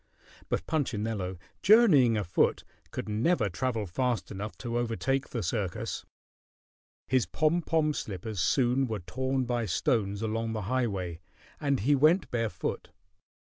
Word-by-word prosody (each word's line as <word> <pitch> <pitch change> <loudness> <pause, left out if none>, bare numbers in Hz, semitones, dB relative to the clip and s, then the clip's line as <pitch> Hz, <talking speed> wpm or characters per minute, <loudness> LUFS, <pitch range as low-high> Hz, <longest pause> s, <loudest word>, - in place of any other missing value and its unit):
But 85 - -1
Punchinello, 110 - -2 0.2
journeying 165 - +6
afoot, 90 -5 +1 0.3
could - - -5
never 110 - +1
travel 115 +3 -2
fast 120 +6 -1
enough 105 +2 -6
to 120 -1 -2
overtake 130 +3 -1
the 115 -4 -3
circus. 105 -8 -3 1.0
His 125 -7 +2
pom 155 - +1
pom 155 -2 +1
slippers 100 -3 -5
soon 125 +6 +2
were 110 -4 -3
torn 130 +7 -1
by 120 -2 -1
stones 100 +4 0
along 110 +1 -1
the 110 -2 -3
highway, 100 -7 -1 0.4
and 140 -5 0
he 140 +8 +3
went 155 +4 +4
barefoot. 115 -7 -2
115 Hz, 130 wpm, -29 LUFS, 105-135 Hz, 1.0 s, journeying